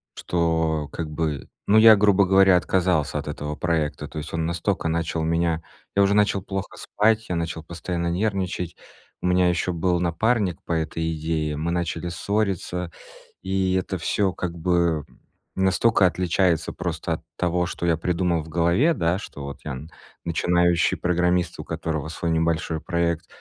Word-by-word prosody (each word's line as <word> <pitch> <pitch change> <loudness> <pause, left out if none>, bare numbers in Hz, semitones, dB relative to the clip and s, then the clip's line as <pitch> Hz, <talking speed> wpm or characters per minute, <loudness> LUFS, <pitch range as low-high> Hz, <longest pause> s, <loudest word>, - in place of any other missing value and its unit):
что, 80 -3 0
как 80 -2 -4
бы, 75 -3 -2 0.2
ну, 105 - +5
я, 110 0 +9
грубо 100 -1 +4
говоря, 95 0 +6
отказался 85 -4 +1
от 75 - -7
этого 75 0 -4
проекта. 80 -3 -1
То - - -10
есть 75 +1 -6
он 80 -1 -1
настолько 85 +2 -1
начал 85 0 -1
меня 85 0 +1 0.3
Я 100 - +4
уже 100 +1 +3
начал 105 -2 +2
плохо 95 0 -5
спать, 110 +1 +1
я 90 - -1
начал 85 -1 -3
постоянно 85 +1 -4
нервничать. 90 -2 -1 0.5
У - - -4
меня 90 0 +4
ещё 90 +1 0
был 90 +1 +1
напарник 95 +2 0
по - - -7
этой 80 0 -1
идее. 80 -1 -2
Мы 80 +3 -2
начали 85 0 -2
ссориться. 90 -2 -2 0.5
И 95 -1 0
это 95 0 -1
всё, 95 +3 0
как 85 -2 -4
бы, 85 -3 +1 0.5
настолько 95 +2 +3
отличается 90 -1 +1
просто 85 -1 -3
от 80 - -5
того, 90 0 0
что 85 0 -4
я 85 -2 +2
придумал 85 0 0
в 80 - -12
голове, 85 - +3
да, 85 - 0
что 75 -8 -8
вот 70 -1 -7
я - - -3
н 70 +5 -7 0.3
начинающий 85 0 +2
программист, 90 -1 +1
у - - -4
которого 80 -2 -3
свой 85 +1 -2
небольшой 80 0 0
проект, 85 -1 -1
85 Hz, 165 wpm, -24 LUFS, 80-95 Hz, 0.5 s, я